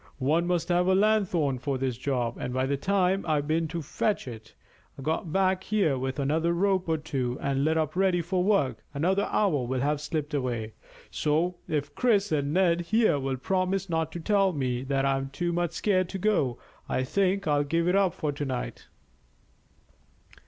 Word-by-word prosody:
"One 155 +6 +1
must 175 -1 0
have 175 +1 +2
a 190 - +4
lanthorn 185 -10 +2
for 135 +1 -2
this 130 -2 -1
job, 125 -2 -2
and 125 - -3
by 130 0 +1
the 140 +1 0
time 190 +4 +1
I've 150 -2 0
been 160 +1 +1
to 165 +1 -5
fetch 205 +3 -1
it, 110 -2 -10 0.4
got 160 +3 -2
back 190 +1 +1
here 195 -9 +2
with 130 +1 -3
another 160 +4 +1
rope 185 0 +1
or 160 - +2
two, 130 -5 -3
and 140 0 0
lit 160 +2 +2
up 155 0 -1
ready 185 -1 +2
for 180 +2 0
work, 140 - +1
another 190 +7 +1
hour 175 -11 +2
will 125 +1 -2
have 145 +1 0
slipped 150 0 -3
away; 120 -6 -2 0.4
so 165 +4 0
if 145 -2 -2
Chris 210 -5 +2
and 145 -2 0
Ned 175 0 +3
here 215 -3 +2
will 135 -1 -2
promise 185 +4 -1
not 160 -1 0
to 175 - -5
tell 195 +1 +2
me 130 -4 -1
that 135 0 0
I'm 135 0 0
too 170 +5 -2
much 175 -1 -1
scared 185 -1 +1
to 195 - -4
go, 175 - +1 0.3
I 130 - 0
think 195 +7 0
I'll 145 -1 +3
give 165 +4 0
it 180 - +3
up 195 -3 +2
for 150 - -2
to 145 +1 -5
night." 130 -3 -4
160 Hz, 190 wpm, -27 LUFS, 135-185 Hz, 0.4 s, a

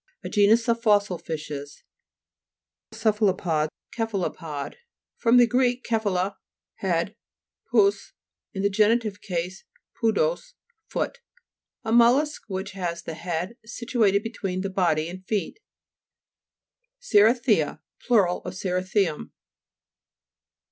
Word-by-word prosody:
A - - -5
genus 220 +3 +4
of 230 0 +1
fossil 205 -5 +2
fishes 145 -3 -6 1.1
(p. 220 - -11
37). 220 -1 +3 0.2
CE'PHALOPOD 155 -5 0 0.3
(kt'f 225 -1 -2
alu 190 - -1
pod) 150 -5 -6 0.4
fr. 230 - -1
gr. 245 +1 +5 0.2
kephale, 200 -4 0 0.4
head, 185 +2 -1 0.6
pous, 400 -1 +3 0.4
in 195 -3 -4
genitive 215 0 +2
case 180 0 -4 0.4
podos, - - +1 0.3
foot. - - -3 0.6
A 220 - -3
mollusk 250 +6 +4
which 195 0 -4
has 175 -3 -4
the 165 - -5
head 175 +5 -4
situated 220 -3 +1
between 195 -5 -3
the 195 0 -3
body 170 -5 +1
and 185 +2 -8
feet. 210 - -2 1.4
CERI'THIA 220 - +3 0.2
Plur. 225 -7 +4
of 180 +1 -4
cerithium. 185 -2 -1
200 Hz, 105 wpm, -25 LUFS, 180-230 Hz, 1.4 s, gr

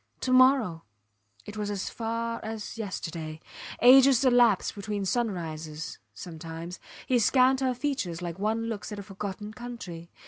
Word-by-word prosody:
To 255 - -1
morrow! 255 -10 +4 0.6
It 210 +1 -8
was 210 -1 -2
as 200 -2 -3
far 230 0 -3
as 220 -1 -6
yesterday. 165 -7 -5 0.4
Ages 265 +1 +7
elapsed 240 -5 +4
between 205 -1 -4
sunrises 165 -8 -3 0.2
sometimes. 165 +1 -8 0.3
He 250 -2 +2
scanned 260 +3 +4
her 260 -2 0
features 250 - -2
like 175 0 -5
one 220 +2 0
looks 225 -2 -5
at 210 - -5
a 200 - -6
forgotten 205 +1 -6
country. 215 -9 -8
210 Hz, 140 wpm, -28 LUFS, 175-245 Hz, 0.6 s, Ages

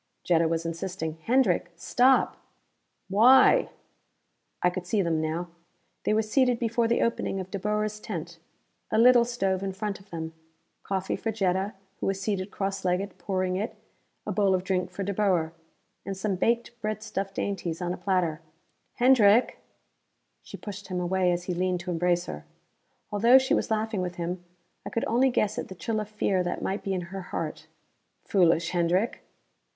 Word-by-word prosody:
Jetta 165 -2 +3
was 165 0 -1
insisting. 165 -1 -4
"Hendrick, 230 -9 +2
stop!" 255 +9 +3 0.7
"Why?" 235 +7 +6 0.9
I 180 - +4
could 180 0 -6
see 200 +1 +1
them 165 -2 0
now. 165 +3 -2 0.6
They - - +2
were 220 - +2
seated 250 +3 +2
before 230 0 +1
the 235 - +2
opening 230 -4 -1
of 185 0 -7
De 200 - -3
Boer's 210 +1 -1
tent. 170 -5 -6 0.5
A - - 0
little 240 +1 +7
stove 195 -6 -1
in 195 -1 -3
front 200 0 -4
of 195 +1 -20
them. 160 -1 -5 0.5
Coffee 190 -1 -2
for 225 - -2
Jetta, 195 -1 0 0.2
who - - -2
was 195 0 -1
seated 195 -1 -2
cross 195 -1 -3
legged, 185 +1 -1
pouring 185 0 -1
it; 210 +4 -3 0.5
a - - -2
bowl 200 -3 +3
of 180 - -2
drink 185 -1 -1
for 185 +2 -5
De 200 +1 -2
Boer. 180 -6 +1 0.5
And 195 -1 -5
some 195 0 -1
baked 235 +6 +1
breadstuff 215 -2 -3
dainties 190 -4 -3
on 175 -1 -2
a - - -6
platter. 175 -5 0 0.5
"Hendrick 240 -3 +5 0.4
" - - -49
She - - -10
pushed 205 -1 -8
him 185 -2 -3
away 180 0 +1
as 175 0 -1
he 180 - -3
leaned 180 0 0
to 180 0 -4
embrace 175 +1 +1
her. 75 0 -7 0.7
Although 230 +5 +6
she 265 0 +2
was - - +1
laughing 220 -2 -1
with 180 -1 -3
him, 175 +1 -4 0.4
I - - -5
could 230 - -1
only 250 +4 +3
guess 215 -2 0
at - - -4
the 190 - -9
chill 215 +4 -2
of 215 -1 -5
fear 200 -3 0
that 175 0 -3
might 195 +2 -2
be 195 -1 -2
in 180 - -2
her 195 - -4
heart. 180 - -5 0.6
"Foolish, 170 -3 +3
Hendrick!" 180 +5 +1
190 Hz, 175 wpm, -27 LUFS, 180-215 Hz, 0.9 s, little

